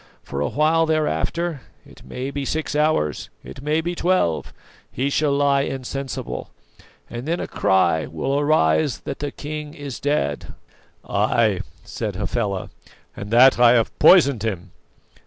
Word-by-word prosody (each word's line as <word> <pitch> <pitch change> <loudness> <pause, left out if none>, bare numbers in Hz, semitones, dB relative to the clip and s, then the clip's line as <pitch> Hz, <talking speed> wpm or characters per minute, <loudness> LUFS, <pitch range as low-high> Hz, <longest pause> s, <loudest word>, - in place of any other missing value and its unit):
For 70 - -5
a 75 - +1
while 160 +2 +2
thereafter 160 0 -1 0.2
it - - -17
may 130 +2 -5
be 140 0 -4
six 155 +2 -3
hours, 150 - 0
it - - -10
may 150 +3 0
be 175 +2 -3
twelve 175 - 0 0.4
he 135 +3 -2
shall 150 0 +1
lie 140 0 +2
insensible, 135 0 -5 0.6
and 120 +4 -7
then 170 +2 -1
a - - -3
cry 85 -5 +1
will 135 - -2
arise 145 - +2
that - - -6
the 145 - -3
king 150 +1 -7
is 140 -3 -7
dead!" 145 - -2 0.5
"Ay," - - +1 0.2
said 105 -4 -5
Hafela, 100 -1 -3 0.4
"and 100 - -7
that 125 +3 +6
I 120 -1 +7
have 115 -2 +1
poisoned 140 - +6
him!" 100 -6 -4
140 Hz, 145 wpm, -22 LUFS, 110-150 Hz, 0.6 s, I